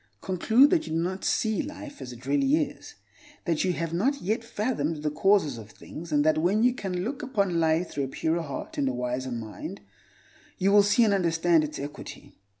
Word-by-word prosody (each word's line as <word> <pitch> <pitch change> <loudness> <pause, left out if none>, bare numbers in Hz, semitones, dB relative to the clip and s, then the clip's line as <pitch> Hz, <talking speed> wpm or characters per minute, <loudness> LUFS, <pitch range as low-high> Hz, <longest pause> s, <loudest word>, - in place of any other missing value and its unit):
Conclude 220 +9 +4
that 330 -3 +2
you - - -4
do 165 - +1
not 185 +3 -2
see 220 -2 +1
life 290 -1 -9
as 125 - -7
it 120 +1 -12
really 140 0 +2
is; 155 -1 -3 0.5
that 165 -2 +1
you 185 - +1
have 165 -1 -3
not 265 +11 +1
yet 215 +5 -1
fathomed 185 - -2
the 150 - 0
causes 155 - +2
of 105 -1 -11
things, 165 +9 -10
and 145 0 +2
that 155 0 +3
when 195 +7 +2
you 250 0 +4
can 185 -7 -3
look 265 +7 -4
upon 200 - 0
life 160 +2 +1
through 140 -1 -2
a - - -5
purer 160 +5 -1
heart 145 -4 -6
and 135 - +1
a - - -2
wiser 125 +1 -3
mind, 110 -5 -6 0.8
you 195 +2 +2
will 205 0 +7
see 205 +4 +4
and 210 -3 +3
understand 170 -3 +3
its 150 0 -5
equity. 145 +2 -8
170 Hz, 210 wpm, -27 LUFS, 145-205 Hz, 0.8 s, will